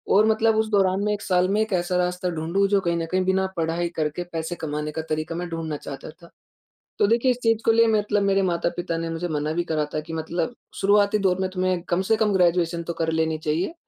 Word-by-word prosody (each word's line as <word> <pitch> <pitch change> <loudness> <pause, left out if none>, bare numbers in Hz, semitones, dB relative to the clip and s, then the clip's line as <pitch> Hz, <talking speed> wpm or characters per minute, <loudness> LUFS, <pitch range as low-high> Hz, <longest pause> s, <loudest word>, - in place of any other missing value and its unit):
और 210 +2 +6
मतलब 220 0 +3
उस 220 0 +1
दौरान 195 -1 +2
मैं 210 0 +1
1 205 - -4
साल 180 -1 +2
में 210 +2 +1
एक 220 -2 -1
ऐसा 180 0 0
रास्ता 180 0 -1
ढूँढूँ 170 +4 0
जो 200 -1 +3
कहीं 170 -1 0
न 165 - -2
कहीं 185 0 +2
बिना 190 0 +2
पढ़ाई 165 +1 0
करके 155 +2 -2
पैसे 165 +1 -3
कमाने 150 -1 -4
का 160 - -3
तरीक़ा 155 +2 -2
मैं 175 +1 -3
ढूँढना 160 -2 -4
चाहता 140 +1 -8
था। 170 +1 -18 0.7
तो 200 - +4
देखिए 235 +3 +3
इस 245 - -1
चीज़ 225 -1 +3
के 225 - +5
लिए 230 0 +5
मतलब 210 -2 +1
मेरे 195 0 +2
माता-पिता 170 -1 -1
ने 165 0 -3
मुझे 170 +2 -3
मना 150 0 -1
भी 175 +1 0
करा 155 -1 +1
था - - +1
कि 160 - -9
मतलब 165 +7 -3 0.3
शुरुआती 205 +1 +4
दौर 190 -2 +1
में 190 - 0
तुम्हे 185 -1 +1
कम 175 +2 +2
से - - +6
कम 215 -2 +2
ग्रेजुएशन 175 -2 +2
तो 170 0 -4
कर 160 -1 -1
लेनी 160 0 0
चाहिए। 155 - -1
180 Hz, 240 wpm, -24 LUFS, 165-200 Hz, 0.7 s, और